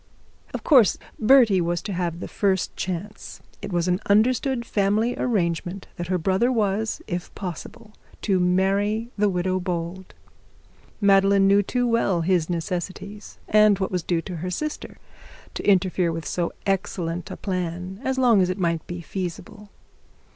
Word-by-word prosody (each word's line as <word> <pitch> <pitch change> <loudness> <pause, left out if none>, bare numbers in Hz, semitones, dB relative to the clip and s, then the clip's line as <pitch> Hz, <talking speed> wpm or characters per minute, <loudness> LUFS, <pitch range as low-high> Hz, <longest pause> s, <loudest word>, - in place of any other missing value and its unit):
Of - - -5
course 255 - +5 0.2
Bertie 225 -5 +5
was 175 0 0
to 205 - -4
have 175 -1 -3
the - - -5
first 190 -3 0
chance. 185 +3 -5 0.2
It - - -6
was 175 0 0
an 180 0 +1
understood 240 +4 +2
family 210 +3 +1
arrangement 180 -4 -1
that 175 - -4
her 185 0 +1
brother 190 +8 +1
was, 215 -2 -1
if 175 0 -5
possible, 210 +4 -8 0.3
to 195 -3 +2
marry 200 +5 +1
the 210 0 +2
widow 185 0 0
Bold. 180 0 -5 0.8
Madeline 195 -1 +4
knew 200 +1 +5
too 245 +5 -1
well 215 -7 +1
the 175 -1 +2
necessities 185 +4 -5
and 210 -1 +5
what 190 0 -2
was 180 -1 -1
due 165 -1 -1
to 180 -3 -6
her 180 +3 -4
sister 305 - -5 0.6
to - - -1
interfere 185 -2 +2
with 165 -1 -5
so 175 -1 -2
excellent 180 -3 -2
a - - -7
plan, 180 0 -4
as 265 0 -1
long 240 -6 +5
as 180 - +2
it 185 - -2
might 170 -3 -1
be 175 0 -6
feasible. 185 +4 -6
190 Hz, 155 wpm, -24 LUFS, 175-210 Hz, 0.8 s, course